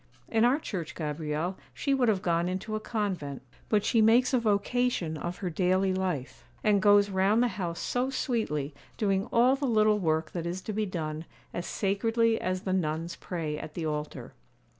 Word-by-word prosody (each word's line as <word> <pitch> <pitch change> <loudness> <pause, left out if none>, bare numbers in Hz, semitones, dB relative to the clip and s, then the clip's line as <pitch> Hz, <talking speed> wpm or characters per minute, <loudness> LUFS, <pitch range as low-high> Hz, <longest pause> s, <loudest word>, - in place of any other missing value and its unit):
In 225 -1 +2
our 255 +4 +4
Church, 175 - -5
Gabrielle, 155 +3 -3 0.2
she 275 - 0
would 255 -4 +3
have 195 -3 +1
gone 170 0 +1
into 190 +4 -3
a - - -1
convent; 190 - -3 0.3
but 210 -2 +2
she 230 - +3
makes 235 +4 +4
a 255 - +4
vocation 215 -4 0
of 175 +3 -4
her - - 0
daily 185 +2 +2
life, 180 -8 -3 0.2
and 205 -2 +3
goes 205 0 +5
round 195 +5 +3
the 245 - +2
house 175 -6 -4
so 250 +1 -1
sweetly, 215 - -1 0.2
doing 195 -2 +1
all 245 +3 +5
the 275 0 -2
little 215 -2 +3
work 160 -3 0
that 170 -1 -3
is 180 +2 -4
to 215 - -4
be 215 0 -1
done, 160 -3 -4 0.3
as 175 - -4
sacredly 225 +3 +1
as 185 0 -1
the 190 - -2
nuns 165 -1 -1
pray 160 -4 -4
at 155 - -8
the 170 - -3
altar. 150 -1 -4
190 Hz, 185 wpm, -29 LUFS, 170-220 Hz, 0.3 s, goes